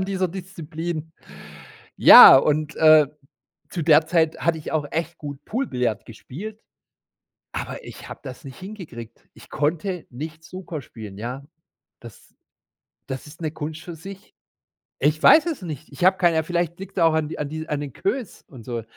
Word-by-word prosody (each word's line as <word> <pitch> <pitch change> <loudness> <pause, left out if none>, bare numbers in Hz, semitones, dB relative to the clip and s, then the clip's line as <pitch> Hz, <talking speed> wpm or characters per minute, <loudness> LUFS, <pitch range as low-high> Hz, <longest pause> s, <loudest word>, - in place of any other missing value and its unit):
an 190 - 0
dieser 190 -2 -1
Disziplin. 165 -3 -6 0.8
Ja, - - +11
und, 150 +2 +1
äh, 155 -2 +6 0.6
zu 170 - -3
der 155 0 +5
Zeit 165 -2 +1
hatte 170 -1 +1
ich 155 - -7
auch 155 -2 0
echt 165 +1 -3
gut 145 -1 -8
Pool-Billiard 125 - -2
gespielt, 195 - -9 0.9
aber - - -6
ich - - -11
habe - - -9
das 130 -2 -9
nicht 135 - -10
hingekriegt. 160 - -10
Ich - - -17
konnte 165 +4 -2
nicht 155 +5 -8
Snooker 175 -4 -7
spielen, 105 -5 -11
ja? 125 +5 -6 0.6
Das - - -15 0.7
das 130 -1 -6
ist 160 +3 -14
'ne 155 -2 -2
Kunst 155 0 -6
für 170 -2 -8
sich. 195 +4 -12 0.6
Ich 155 +3 +1
weiß 320 +2 +7
es 320 -7 -3
nicht. 155 -2 -8
Ich 175 - -3
habe 190 +1 +5
keine 170 -3 +3
ja, 160 - +2
vielleicht 175 0 -2
liegt's 195 0 -8
auch 165 -2 +4
an 155 -1 0
d - - -7
an 150 - -3
dies 160 +2 -6
an 150 -1 -2
den 140 -4 -6
Queues 230 - -4
und 120 -5 -13
so. 120 -2 -4
160 Hz, 175 wpm, -23 LUFS, 145-175 Hz, 0.9 s, Ja